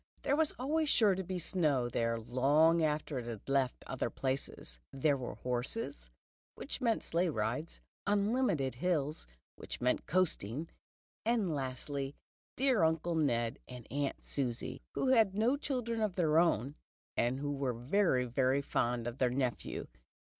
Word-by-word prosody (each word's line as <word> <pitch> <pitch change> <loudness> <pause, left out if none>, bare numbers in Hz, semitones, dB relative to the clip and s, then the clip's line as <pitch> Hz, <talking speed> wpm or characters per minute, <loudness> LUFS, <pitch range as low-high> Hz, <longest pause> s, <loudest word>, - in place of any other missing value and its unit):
There 280 - +2
was 310 0 +2
always 300 +4 0
sure 215 -7 +5
to 190 +1 -2
be 185 +1 -3
snow 155 -8 +1
there 115 -1 0
long 145 +8 +4
after 150 -3 0
it 120 - -7
had 115 -4 -7
left 135 -2 +1
other 130 -3 -2
places. 130 - -3
There 140 +2 +2
were 125 -5 -5
horses, 125 - -3 0.5
which 275 - -6
meant 230 -3 +1
sleigh 175 +2 +1
rides, 120 +5 -2 0.3
unlimited 205 - +2
hills, 150 - -1 0.3
which - - -6
meant 125 +1 0
coasting, 160 - 0 0.5
and 220 -7 +1
lastly 135 +1 -3 0.4
dear 255 -8 +3
Uncle 160 +1 +1
Ned 120 -8 +1
and 125 -2 -9
Aunt 140 +1 -2
Susie, 125 -5 -3
who 265 - +1
had 220 -7 +4
no 230 +6 +3
children 245 -6 -2
of 210 -4 0
their 160 -3 +4
own, 145 - +2 0.4
and 120 +3 +1
who 145 0 -2
were 135 -2 -1
very, 130 - +2
very 130 +3 +1
fond 120 -3 0
of 120 +2 -5
their 125 - +3
nephew. 125 -1 -2
145 Hz, 150 wpm, -33 LUFS, 125-190 Hz, 0.5 s, sure